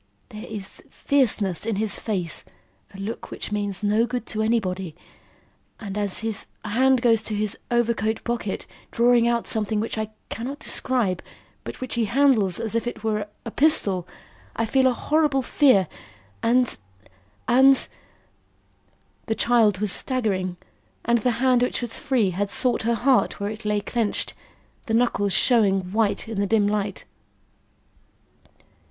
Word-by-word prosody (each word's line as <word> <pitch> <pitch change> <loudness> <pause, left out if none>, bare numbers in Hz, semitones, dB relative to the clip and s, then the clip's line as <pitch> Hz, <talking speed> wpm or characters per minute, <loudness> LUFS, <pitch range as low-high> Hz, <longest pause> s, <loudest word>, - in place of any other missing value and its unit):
There 215 0 -9
is 205 -3 -8
fierceness 220 - +1
in 225 -1 -1
his 215 +1 0
face 180 -7 -1 0.5
a 195 - -12
look 210 +4 -6
which - - -6
means 205 -1 -3
no 215 +3 +2
good 245 -1 -4
to 215 - -2
anybody 190 -7 -1 0.8
and 200 -3 -6
as 205 -2 -1
his 220 -2 -2 0.2
hand 255 +4 +2
goes 225 -2 +4
to 220 -1 -4
his 210 0 -2
overcoat 230 -2 0
pocket, 235 -4 -3 0.2
drawing 235 0 +3
out 235 -1 0
something 215 -1 -1
which 220 0 -3
I 215 -1 -3 0.2
cannot 260 +5 -5
describe, 245 - 0 0.4
but - - -8
which 255 - -4
he 235 -2 +1
handles 220 -6 +3
as 225 -2 0
if 230 +1 -1
it 225 -3 -6
were 210 -2 -1 0.2
a 230 - -5
pistol, 200 - +3 0.5
I 230 - 0
feel 260 +3 +3
a - - +4
horrible 295 0 +1
fear, 255 - +4 0.5
and 245 +1 +2 0.7
and 265 +2 +5 0.7
" - - -40
The 220 - 0
child 225 -5 +3
was 210 0 0
staggering, 195 -9 -1 0.5
and 235 +1 +3
the 245 +2 +1
hand 255 -1 +3
which 250 - 0
was 240 -2 -5
free 235 -8 +1
had 200 +3 -2
sought 245 +3 +1
her 235 +1 +1
heart 255 +3 +2
where 205 +1 -2
it 220 +1 -9
lay 210 -1 +1
clenched, 225 0 -1 0.5
the 225 - +1
knuckles 205 -5 +1
showing 195 -7 +3
white 220 -1 0
in 220 -3 -4
the 200 - +1
dim 215 0 +3
light. 205 -1 -2
220 Hz, 155 wpm, -24 LUFS, 205-240 Hz, 0.8 s, and